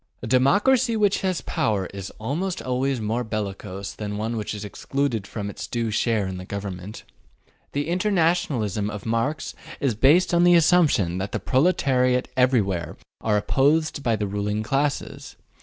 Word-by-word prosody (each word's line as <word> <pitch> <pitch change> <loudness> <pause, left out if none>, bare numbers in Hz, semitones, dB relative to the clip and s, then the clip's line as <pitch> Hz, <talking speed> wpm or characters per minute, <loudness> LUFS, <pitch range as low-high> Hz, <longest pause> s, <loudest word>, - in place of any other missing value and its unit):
A - - -2
democracy 210 - +3
which 205 -2 +2
has 185 -3 -1
power 100 -4 -1
is 100 -1 -6
almost 165 - -2
always 130 +1 -1
more 110 +3 -1
bellicose 100 -2 -5
than 105 -1 -5
one 110 +2 -2
which 110 -1 -3
is 105 0 -6
excluded 120 0 -2
from 105 -2 -5
its 100 - -6
due 115 -2 -2
share 110 -1 +1
in 95 -1 -4
the 90 - -7
government. 100 0 -6 0.7
The 145 +1 -1
internationalism 165 - +1
of 105 -2 -7
Marx 115 +7 -1 0.3
is 135 -4 +1
based 145 - +4
upon 170 0 +4
the 175 0 +6
assumption 150 - +3
that 100 +1 -4
the - - -1
proletariat 130 -4 +2
everywhere 105 - +1 0.3
are 105 -2 +2
oppressed 145 +7 +1
by 115 -4 +1
the 105 - -2
ruling 105 +1 -2
classes. 140 +4 -2
120 Hz, 155 wpm, -24 LUFS, 105-150 Hz, 0.7 s, the